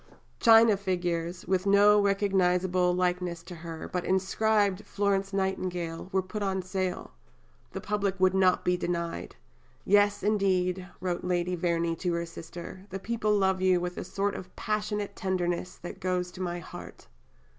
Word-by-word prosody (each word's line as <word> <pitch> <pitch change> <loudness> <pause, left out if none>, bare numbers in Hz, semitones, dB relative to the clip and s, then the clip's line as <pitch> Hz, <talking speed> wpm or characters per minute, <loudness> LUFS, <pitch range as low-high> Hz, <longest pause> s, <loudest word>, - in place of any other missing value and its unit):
China 225 -1 +7
figures, 175 -2 -2
with 190 +1 +1
no 205 +1 +6
recognizable 185 -2 +2
likeness 180 -1 -1
to 180 - -9
her, 165 -1 -7
but 180 -1 -3
inscribed 200 +1 +1
"Florence 195 -1 0
Nightingale," 185 -3 -2
were 190 0 +1
put 210 +3 -6
on 190 -2 -1
sale. 185 -1 -3 0.6
The - - -4
public 200 -2 -1
would 185 0 +4
not 185 -1 +3
be 180 - +3
denied. 170 -1 -3 0.5
"Yes, 205 0 +3
indeed," 190 -3 +1
wrote 180 -1 -2
Lady 180 0 0
Verney 170 -1 0
to 175 0 -1
her 170 0 -1
sister, 170 +3 -9
"the 190 - -4
people 215 +1 0
love 190 -1 +1
you 185 -1 +4
with 180 0 -4
a - - -4
sort 200 0 -1
of 180 0 -9
passionate 210 -1 -2
tenderness 180 -1 -2
that 175 - -9
goes 180 -1 -1
to 185 - -9
my 175 -1 -2
heart." 175 - -10
185 Hz, 155 wpm, -28 LUFS, 180-200 Hz, 0.6 s, China